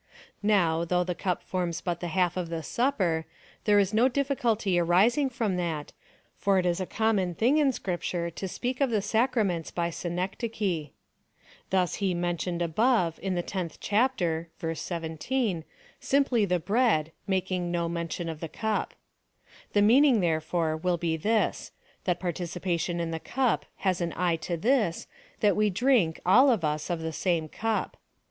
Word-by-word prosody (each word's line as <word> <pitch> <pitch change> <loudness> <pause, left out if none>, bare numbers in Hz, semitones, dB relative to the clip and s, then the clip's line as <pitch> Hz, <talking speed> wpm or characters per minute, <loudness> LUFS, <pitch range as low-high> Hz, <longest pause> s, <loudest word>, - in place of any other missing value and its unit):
Now, 175 -6 +2
though 180 +1 +1
the 180 0 -2
cup 180 +1 -2
forms 180 -2 -2
but 175 -2 -3
the 175 - -4
half 175 0 +1
of 180 -2 -3
the 165 -1 -4
Supper, 180 - 0 0.4
there 210 -1 +5
is 200 0 +2
no 230 +4 +5
difficulty 235 -8 +1
arising 210 - +3
from 225 -7 -1
that, 165 -4 -3 0.4
for 200 -1 +2
it 185 - +1
is 175 0 +1
a 185 - -3
common 205 -6 0
thing 255 - +3
in 285 -3 +4
Scrip 180 -7 -3
ture 170 -1 -2
to 190 +4 -5
speak 250 +7 -3
of 275 - +3
the 215 -4 0
sacraments 220 -9 +1
by 170 -1 -2
synecdoche.^ 180 - -3 0.8
Thus 185 -2 +1
he 190 -3 +1
mentioned 175 0 -1
above 180 0 +2
in 190 -2 -1
the 175 - -1
tenth 180 -4 -4
chapter 185 -8 0
(verse 165 -2 -4
1 165 -2 -4
7) 230 -11 0 0.4
simply 265 -6 +2
the 180 -2 +1
bread, 190 -4 +2 0.2
making 185 -2 -1
no 170 -1 0
mention 170 0 -3
of 160 -2 -5
the 165 - -5
cup. 220 +5 -2 0.8
The 205 - +4
meaning, 250 +2 +6
there 165 -4 +1
fore, 160 0 -1
will 175 +2 0
be 165 -1 -1
this 215 +7 0 0.2
— - - -34
that 180 -2 0
participation 175 -1 -2
in 165 -1 -2
the 165 - -3
cup 255 +6 0
has 185 -2 0
an 170 -1 -1
eye 175 -1 +1
to 170 +1 -3
this 215 -3 +1 0.2
— - - -29
that 205 -2 +4
we 210 0 +3
drink, 205 -5 +2
all 250 +10 +6
of 215 -10 +2
us, 150 0 -2
of 170 -2 -2
the 160 0 -3
same 165 0 0
cup. 225 +7 -2
180 Hz, 175 wpm, -28 LUFS, 170-220 Hz, 0.8 s, meaning